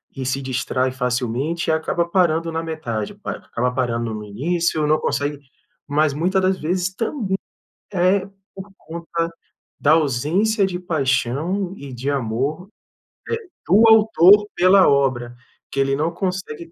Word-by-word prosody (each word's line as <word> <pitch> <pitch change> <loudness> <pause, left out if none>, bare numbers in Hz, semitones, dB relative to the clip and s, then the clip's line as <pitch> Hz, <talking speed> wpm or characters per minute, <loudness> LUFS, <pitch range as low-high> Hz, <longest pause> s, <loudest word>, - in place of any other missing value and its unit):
e 130 - -4
se 135 +2 -1
distrai 130 0 -1
facilmente, 130 +6 -2
e - - +4
acaba 170 +2 0
parando 170 -2 +1
na 165 0 -3
metade, 120 -10 -4
pa - - -6
acaba 125 +2 -2
parando 120 -3 -1
no 105 0 -6
início, 155 +8 -1
não 155 +1 +3
consegue 145 0 -2 0.5
mas 150 0 +2
muita 180 +6 +1
das 185 0 +1
vezes 180 +3 -1
também 215 -3 -2 0.6
é 185 +2 +2 0.3
por 195 +1 -9
conta 165 +1 -4 0.5
da - - +3
ausência 165 - +2
de 180 -2 -3
paixão 160 +4 -1
e 140 -2 -9
de 130 +4 -3
amor, 140 - -2 0.8
eh, - - -23 0.2
do 205 +6 +5
autor 210 -2 +6
pela 185 +1 +5
obra, 130 -4 +1 0.4
que 135 - -3
ele 135 0 +2
não 155 +4 0
consegue 175 -3 -4
160 Hz, 145 wpm, -21 LUFS, 130-185 Hz, 0.8 s, autor